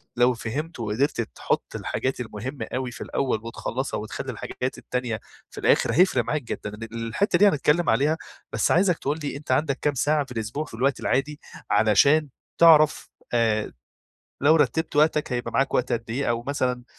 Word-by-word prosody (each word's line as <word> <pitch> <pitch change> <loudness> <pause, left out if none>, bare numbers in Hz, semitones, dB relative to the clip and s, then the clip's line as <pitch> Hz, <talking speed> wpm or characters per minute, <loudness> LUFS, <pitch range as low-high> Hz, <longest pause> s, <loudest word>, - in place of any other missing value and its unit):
لو 125 +1 +4
فهمته 125 +4 -5
وقدرت 120 +5 0
تحط 110 - -3
الحاجات 130 0 -2
المهمة 125 +4 -5
أوي 130 -1 -2
في - - -11
الأول 130 -5 -1
وتخلّصها 120 +3 -4
وتخلّي 110 - -5
الحاجات 130 +1 -5
التانية 125 -4 -3 0.3
في - - -9
الآخر، - - +3
هيفرق 185 +4 +4
معاك 150 -3 -2
جدًا 105 - -5
إن 115 - -9
الحتّة 115 - 0
دي 205 - +7
هنتكلم 150 +2 +2
عليها 150 +4 +2 0.4
بس - - +1
عايزك 180 -1 +3
تقول 150 +3 -2
لي 145 - -3
أنت 145 -3 -6
عندك 140 +1 +1
كام 145 - +1
ساعة 145 +2 +1
في 130 - -16
الأسبوع 115 +6 -3
في - - -15
الوقت 130 +4 0
العادي 145 +3 -1 0.3
علشان 140 +8 +4 0.3
تعرف 155 -2 +5 0.2
آآ، 110 -2 +1 0.7
لو 155 +3 +6
رتبت 150 +2 0
وقتك 150 -2 +2
هيبقى 120 0 -3
معاك 135 +3 +1
وقت 125 0 +1
قدّ 115 -1 -3
إيه، 130 +1 -1
أو 120 0 -1
مثلًا 125 -2 -2
130 Hz, 175 wpm, -25 LUFS, 115-150 Hz, 0.7 s, دي